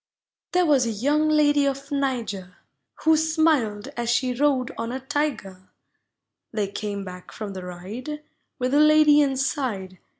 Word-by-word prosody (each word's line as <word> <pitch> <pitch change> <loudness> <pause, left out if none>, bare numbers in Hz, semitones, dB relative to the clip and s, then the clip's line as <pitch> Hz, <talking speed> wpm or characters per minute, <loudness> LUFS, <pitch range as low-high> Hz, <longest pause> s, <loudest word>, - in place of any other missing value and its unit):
There 360 0 +3
was 275 -6 +3
a - - -1
young 290 +8 +1
lady 290 -2 +3
of 275 +1 -4
Niger 235 -10 -2 0.5
Who 320 0 +5
smiled 310 -8 +1
as 240 -4 -4
she 250 +1 +1
rode 265 -1 +1
on 230 +1 -4
a 260 - -3
Tiger; 265 -10 -3 0.8
They 210 -3 -2
came 200 -1 -4
back 180 -1 -10
from 210 -2 -6
the 185 -1 -7
ride 215 +12 -7 0.3
With 255 -2 -1
the 290 - +4
lady 305 -1 +6
inside. 260 - -1
260 Hz, 145 wpm, -24 LUFS, 205-295 Hz, 0.8 s, lady